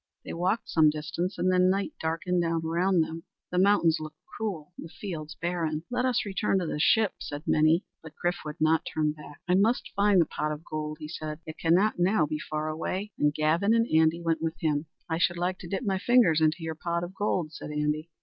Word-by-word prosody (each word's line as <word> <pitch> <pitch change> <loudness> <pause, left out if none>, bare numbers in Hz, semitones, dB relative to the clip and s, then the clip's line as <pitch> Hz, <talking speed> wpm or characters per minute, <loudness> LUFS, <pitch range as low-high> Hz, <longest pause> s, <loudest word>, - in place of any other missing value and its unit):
They - - -5
walked 185 +7 0
some 155 -2 +4
distance 155 +5 -3
and 185 - +2
then 185 0 +4
night 200 +10 0
darkened 165 +3 0
down 165 -1 0
around 175 +2 +2
them. 160 +1 -3 0.3
The 180 - +1
mountains 185 -4 +4
looked 155 -1 -8
cruel; 180 -7 -5
the 165 - -9
fields 160 -5 -7
barren. 165 -3 -2
"Let 250 +1 0
us 255 -4 +1
return 195 0 0
to 185 - -1
the 155 - -3
ship," 220 +5 +3
said 145 +1 -6
many. 155 +3 +3 0.2
But 160 -1 -11
Chrif 175 0 -1
would 150 -1 -7
not 160 +1 +3
turn 155 -3 0
back. 150 -1 -12
"I 180 - +2
must 215 +6 +2
find 200 -1 +4
the 170 - +5
pot 150 0 -3
of 150 +1 -6
gold," 155 0 -4
he 150 - -6
said, 155 -1 -5
"it 155 - -9
cannot 175 +5 +3
now 180 -2 +3
be 150 +1 -3
far 155 0 -3
away." 185 +6 -3
And 150 0 +3
Gavin 160 +8 +2
and 230 0 +3
Andy 160 +2 +3
went 165 -1 0
with 165 0 -2
him. 155 -1 0 0.2
"I 160 0 -1
should 175 0 +2
like 180 +2 -1
to 175 - -8
dip 195 +7 -3
my 195 -4 0
fingers 210 -9 +4
into 160 +2 +2
your 160 0 -3
pot 170 +2 -2
of 175 +2 -6
gold," 180 -6 -1
said - - -8
Andy. 150 +2 -1
165 Hz, 225 wpm, -28 LUFS, 155-185 Hz, 0.3 s, the